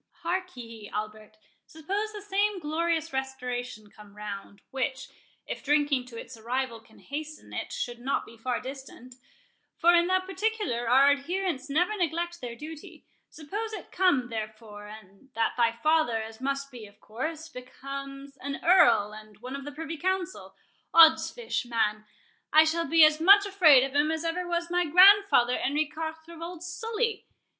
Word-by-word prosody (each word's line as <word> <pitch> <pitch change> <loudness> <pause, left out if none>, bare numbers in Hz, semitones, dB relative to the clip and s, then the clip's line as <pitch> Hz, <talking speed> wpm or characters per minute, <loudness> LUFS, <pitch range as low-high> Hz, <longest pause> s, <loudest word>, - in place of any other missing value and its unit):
—Hark 365 -2 -3
ye, 230 -3 -9
Albert—Suppose 215 - -6
the 415 -1 -9
same 410 0 0
glorious 325 0 -1
Restoration 250 -5 -5
come 210 -1 -16
round—which, 210 +6 -5 0.4
if - - -6
drinking 290 -3 +1
to 230 -2 -9
its 255 - -10
arrival 235 +1 -3
can 220 0 -22
hasten 305 +2 -8
it, - - -5
should 240 -1 -4
not 265 +3 -1
be 230 - -14
far 240 +2 -2
distant,—for 270 - -4
in 345 0 +4
that 370 0 +1
particular 385 - -2
our 270 +3 +6
adherents 290 -1 -2
never 355 +9 +1
neglect 345 -1 -2
their 240 -2 -6
duty, 305 +4 -11 0.2
suppose 415 +9 -6
it - - -8
come, 320 -10 +2
therefore, 215 -2 -7
and 210 +3 -14
that 225 0 +1
thy 235 -2 +3
father, 275 -1 +1
as 220 +2 -8
must 275 +1 -3
be 235 -4 -10
of 205 +1 -21
course, 310 +10 -5
becomes 275 0 -9
an 280 0 -5
Earl 325 - +5
and 215 -1 -13
one 250 +5 -7
of 275 0 -7
the 290 - -6
Privy 320 +2 -6
Council, 370 +2 -3 0.4
oddsfish, 335 - +5
man, 215 -2 -1 0.5
I 310 +1 +7
shall 330 +1 0
be 325 -1 +7
as 310 0 +2
much 400 +4 +7
afraid 335 -10 +6
of 270 0 -3
him 290 +2 +2
as 320 +1 -2
ever 350 +2 -2
was 345 0 -2
my 355 0 +2
grandfather 365 -6 +6
Henri 295 +3 0
Quatre 320 +2 -7
of 330 - -12
old 345 0 -7
Sully. 435 +5 -3
285 Hz, 160 wpm, -27 LUFS, 240-345 Hz, 0.5 s, I